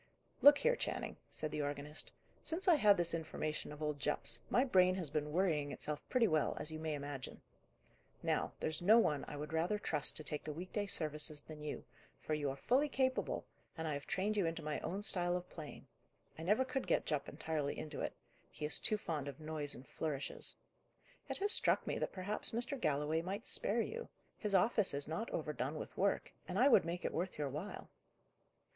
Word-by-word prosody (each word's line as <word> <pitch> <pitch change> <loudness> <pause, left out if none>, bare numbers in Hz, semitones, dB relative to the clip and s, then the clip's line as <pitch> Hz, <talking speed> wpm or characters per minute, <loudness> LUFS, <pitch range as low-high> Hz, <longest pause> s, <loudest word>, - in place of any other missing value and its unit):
"Look 285 0 +10
here, - - +3
Channing," - - -3
said 155 - -3
the 150 - -1
organist. 145 +1 -3 0.3
"Since 355 +4 -2
I 355 - +8
had 210 -10 +6
this 175 -1 +1
information 155 -2 -3
of 150 +1 -7
old 150 -1 -1
Jupp's, 150 +2 +3
my 250 - +4
brain 185 -7 +5
has 170 -7 -2
been 150 -1 -1
worrying 155 -5 +1
itself 150 0 -4
pretty 245 -3 +4
well, 155 -4 +1
as 150 +1 0
you 155 - -5
may 155 -1 -2
imagine. 145 -2 -6 0.8
Now, - - +1
there's 155 +1 -2
no 210 +6 +7
one 150 -11 +3
I 145 - -6
would 150 +2 -5
rather 170 +6 +1
trust 150 -8 0
to 155 - -4
take 150 0 -3
the 150 - -4
week 175 +4 -7
day 205 -1 -1
services 150 -3 +3
than 155 -1 -10
you, 150 - -5 0.3
for 155 - -3
you 145 -2 0
are 135 - -3
fully 270 - +2
capable, 260 -1 0 0.3
and 160 0 -2
I 155 - 0
have 140 0 -5
trained 205 +3 0
you 190 -5 +3
into 165 -1 -3
my 150 0 -2
own 195 +4 -3
style 175 -3 +1
of 180 0 -7
playing: 155 -3 -9 0.5
I - - -9
never 210 +10 +3
could 260 +1 -2
get - - +2
Jupp 145 -2 -1
entirely 150 -1 -2
into 155 -1 -5
it; - - -3 0.3
he 150 - -5
is 150 -4 +1
too 215 - +2
fond 155 -8 -3
of 140 0 -7
noise 155 -2 -3
and 130 - -12
flourishes. 145 -3 -3 0.7
It - - -2
has 405 +1 +1
struck - - +5
me - - -2
that - - -1
perhaps 200 +4 -1
Mr. 240 +5 +1
Galloway 150 +1 +1
might 195 +5 -4
spare 230 +3 +1
you: 470 - -4 0.3
his 210 -3 0
office 205 -3 +3
is 140 0 -2
not 165 +9 -3
overdone 150 -2 -2
with - - -6
work, 200 +1 0
and 180 - -3
I 255 +6 +6
would 235 - +6
make 175 +1 -3
it - - -1
worth 180 +2 -2
your 145 -2 -1
while." 155 +9 -6
160 Hz, 210 wpm, -37 LUFS, 150-200 Hz, 0.8 s, Look